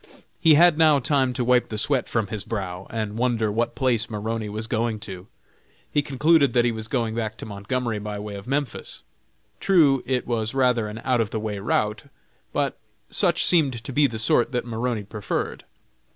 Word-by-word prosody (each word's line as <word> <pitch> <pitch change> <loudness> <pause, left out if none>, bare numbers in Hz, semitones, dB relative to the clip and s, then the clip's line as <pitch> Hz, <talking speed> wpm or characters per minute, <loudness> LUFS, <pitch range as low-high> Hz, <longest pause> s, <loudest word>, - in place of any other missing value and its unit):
He 160 -4 +6
had 170 0 +5
now 155 -2 +6
time 135 -1 +1
to 125 - -1
wipe 125 0 +3
the 110 - -4
sweat 130 +3 +1
from 115 -2 0
his 105 -2 -4
brow, 95 -4 -5
and 110 -1 -4
wonder 115 -4 +1
what 115 +3 -1
place 120 -5 +1
Maroney 110 0 -3
was 110 +2 -4
going 115 -1 -1
to. 95 -2 -8 0.6
He 145 - +2
concluded 145 -1 +3
that 120 -1 +3
he 120 - +2
was 110 -1 -6
going 115 -2 -1
back 110 -1 -3
to - - -8
Montgomery 110 +2 -3
by 105 0 -5
way 105 0 -6
of 100 +2 -8
Memphis. 140 -2 -3 0.6
True, 155 -9 +4
it 125 -2 0
was 115 0 -2
rather 125 -4 +2
an 105 +2 -7
out 125 -3 +2
of 110 - -1
the 110 - -3
way 105 -2 -4
route, 105 +5 -1 0.5
but - - -1 0.3
such - - +2
seemed 135 -9 +2
to 135 - -6
be 145 +2 +4
the 115 -3 -6
sort 110 +3 +2
that 125 - -1
Maroney 115 -1 -2
preferred. 105 0 -4
115 Hz, 195 wpm, -24 LUFS, 110-130 Hz, 0.6 s, He